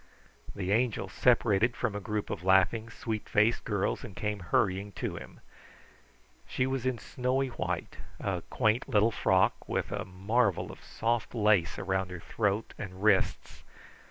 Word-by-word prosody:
The 95 -1 -2
Angel 110 -2 +1
separated 115 +2 +3
from 120 -4 -1
a - - -2
group 105 +1 -3
of 85 - -4
laughing, 95 +4 +3
sweet 110 -2 -5
faced 105 +3 +3
girls 100 +2 -1
and 110 -8 -9
came 105 -1 -2
hurrying 95 +2 0
to - - -4
him. - - -10 1.1
She 130 - 0
was 130 -1 -1
in 130 -2 0
snowy 130 +3 -1
white 90 -7 -4 0.2
a - - -2
quaint 110 +3 +1
little 110 +2 +4
frock, 95 -3 +2
with - - -1
a - - -2
marvel 100 +3 0
of - - -14
soft 115 0 -2
lace 105 -6 +3
around 95 -1 -1
her 90 -1 -7
throat 105 +4 -1
and 95 -1 -7
wrists. 105 -3 +1
105 Hz, 155 wpm, -30 LUFS, 95-115 Hz, 1.1 s, little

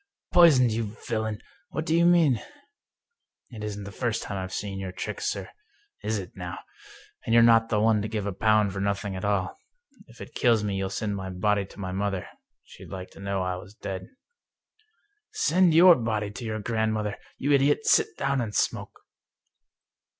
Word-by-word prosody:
" - - -65
" - - -34
Poisoned, 140 -9 +6
you 110 -1 -3
villain! 110 -2 -2 0.3
What 155 +2 -4
do 160 - +1
you 170 +1 +4
mean?" 160 -10 +4 1.1
"It 110 -3 -8
isn't 105 -1 -5
the 100 - -8
first 115 +3 -2
time 100 - -5
I've 95 0 -5
seen 100 -1 -4
your 95 -1 -5
tricks, 95 - -4
sir - - -5 0.3
— 415 0 -38
is 110 0 -1
it 95 -3 -8
now? 90 -1 -6 0.7
And 115 - +1
you're 115 - +7
not 115 -1 +5
the 105 - +1
one 110 0 +3
to 105 - -3
give 110 -2 -3
a 100 - -2
pound 105 0 +2
for 100 - -4
nothing 100 0 -2
at 95 - -6
all. 100 -2 -1 0.5
If 115 -2 -17
it - - -10
kills 115 -3 +3
me 100 -2 -1
you'll 95 0 -2
send 100 +1 -3
my 95 -1 -5
body 100 +2 0
to 100 - -15
my 95 -2 -4
mother 95 -1 -2 0.2
— - - -58
she'd - - -13
like 95 -1 -7
to - - -15
know 100 -1 -2
that 90 - -1
I - - -2
was 95 +3 -12
dead." 95 -3 -6 0.7
" 430 -1 -42
Send 180 -3 +4
your 175 +2 +9
body 110 -6 -2
to 115 +3 -8
your 110 -1 -3
grandmother! 110 -1 -1 0.2
You 140 - -1
idiot, 145 +1 +3
sit - - +3
down 140 -1 0
and 105 -3 -4
smoke - - -2
105 Hz, 205 wpm, -26 LUFS, 100-120 Hz, 1.1 s, your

